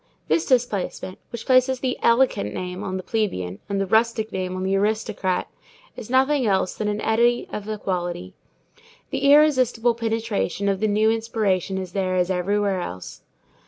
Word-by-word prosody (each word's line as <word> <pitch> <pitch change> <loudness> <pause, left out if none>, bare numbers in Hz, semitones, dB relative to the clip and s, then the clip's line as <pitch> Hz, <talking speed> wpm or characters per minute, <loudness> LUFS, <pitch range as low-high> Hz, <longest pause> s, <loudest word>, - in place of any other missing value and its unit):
This 330 - +1
displacement, 225 -7 -1
which 235 -1 -7
places 255 0 +3
the 255 0 -1
"elegant" 235 - +2
name 180 +1 -5
on 190 -2 -3
the 185 - -6
plebeian 100 - -2
and 200 -1 -1
the 195 - +1
rustic 220 +2 +1
name 185 -1 -3
on 185 - -3
the 190 +1 +1
aristocrat, 200 -2 -1 0.5
is 215 - -9
nothing 265 +2 +3
else 190 -2 +1
than 215 - -3
an 210 0 -2
eddy 240 +2 +2
of 210 0 -5
equality. 185 -3 -3 0.8
The 280 - +1
irresistible 255 -6 +4
penetration 225 -4 -2
of 195 -1 0
the 215 - +1
new 215 +1 +3
inspiration 215 -5 -1
is 185 -2 -5
there 185 -1 -1
as 180 0 +1
everywhere 195 +1 0
else. 90 - -7
210 Hz, 160 wpm, -23 LUFS, 185-230 Hz, 0.8 s, irresistible